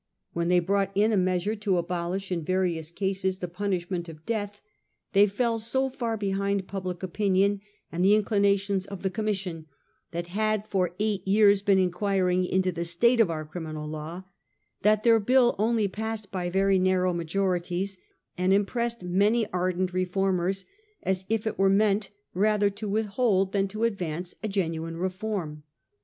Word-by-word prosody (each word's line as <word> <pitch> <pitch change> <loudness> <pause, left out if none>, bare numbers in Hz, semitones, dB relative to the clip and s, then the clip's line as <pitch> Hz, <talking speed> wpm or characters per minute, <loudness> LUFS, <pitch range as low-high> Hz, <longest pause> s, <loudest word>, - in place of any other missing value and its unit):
When 170 0 -1
they 180 0 +4
brought 195 +2 0
in 210 +3 +3
a - - +2
measure 185 +2 +1
to 205 -3 +1
abolish 175 +3 -3
in 170 -3 -1
various 175 -3 -1
cases 190 +1 -1
the 180 - -4
p 180 +4 -8
unishm 185 -2 -1
ent 175 -2 -3
of 155 -1 -12
death, 205 -2 -3 0.5
they 200 +1 +6
fell 230 +3 0
so 265 +4 0
far 235 -4 -2
behind 200 -1 -1
public 185 -2 -5
opinion 195 +1 +1 0.3
and 175 +2 -1
the 200 +2 +6
inclinations 200 -2 +1
of 200 -1 -8
the 190 - 0
Commission 190 -7 -3 0.4
that 170 0 -4
had 215 0 0
for 185 -4 0
eight 205 -3 -1
years 200 0 +5
been 200 -1 +3
inquiring 185 0 +1
into 185 0 +1
the 170 -1 -3
state 235 +9 +2
of 220 -6 +5
our 155 -2 -3
criminal 155 -1 -6
law, 155 +4 -6 0.6
that 215 +1 +3
their 230 -1 +5
bill 245 +3 +4
only 220 -1 +2
passed 215 +1 -5
by 180 -2 -2
very 195 +1 +3
narrow 185 -1 +2
majo 170 +3 -1
rities, 185 +1 -1 0.4
and 185 +1 +1
impressed 235 +3 0
many 205 +6 +2
ardent 185 0 0
reformers 185 0 0 0.4
as 190 0 -1
if 225 -1 0
it 220 - -3
were 195 0 +5
meant 200 0 +2 0.2
rather 205 +1 +2
to 205 +1 -6
withhold 205 -2 +1
than 195 -1 +1
to 215 +3 -4
advance 180 -6 -2
a 220 - -2
genuine 165 -4 -2
reform. 185 -4 -3
195 Hz, 170 wpm, -27 LUFS, 180-210 Hz, 0.6 s, they